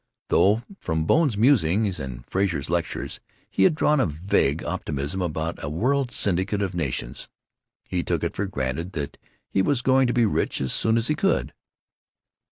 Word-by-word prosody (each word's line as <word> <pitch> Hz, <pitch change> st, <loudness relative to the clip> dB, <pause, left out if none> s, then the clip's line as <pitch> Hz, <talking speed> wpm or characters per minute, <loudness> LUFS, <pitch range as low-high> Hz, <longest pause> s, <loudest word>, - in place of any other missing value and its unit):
Though 105 Hz, +5 st, +4 dB, 0.2 s
from 80 Hz, -2 st, -1 dB
Bone's 145 Hz, -, +3 dB
musings 105 Hz, -, +3 dB
and 65 Hz, -4 st, -7 dB
Frazer's 85 Hz, -7 st, -1 dB
lectures 85 Hz, -2 st, -2 dB, 0.3 s
he 95 Hz, -, +3 dB
had 155 Hz, -, +4 dB
drawn 150 Hz, -1 st, +3 dB
a 130 Hz, -, +3 dB
vague 80 Hz, -1 st, 0 dB
optimism 75 Hz, +7 st, -3 dB
about 80 Hz, -1 st, -3 dB
a 70 Hz, -, -2 dB
world 125 Hz, -, 0 dB
syndicate 100 Hz, -1 st, 0 dB
of 95 Hz, -1 st, -2 dB
nations, 70 Hz, -7 st, -3 dB, 0.5 s
he 90 Hz, -2 st, -2 dB
took -, -, -1 dB
it -, -, -2 dB
for 100 Hz, -, -1 dB
granted 75 Hz, +2 st, -3 dB
that 70 Hz, -4 st, -5 dB, 0.3 s
he 95 Hz, -, +1 dB
was 125 Hz, +3 st, +1 dB
going 130 Hz, 0 st, +4 dB
to 120 Hz, -, 0 dB
be 120 Hz, -2 st, +3 dB
rich 105 Hz, -, 0 dB
as 65 Hz, -2 st, -1 dB
soon 110 Hz, 0 st, +2 dB
as 115 Hz, +1 st, +1 dB
he -, -, +3 dB
could. 195 Hz, +6 st, 0 dB
95 Hz, 175 wpm, -24 LUFS, 80-115 Hz, 0.5 s, Though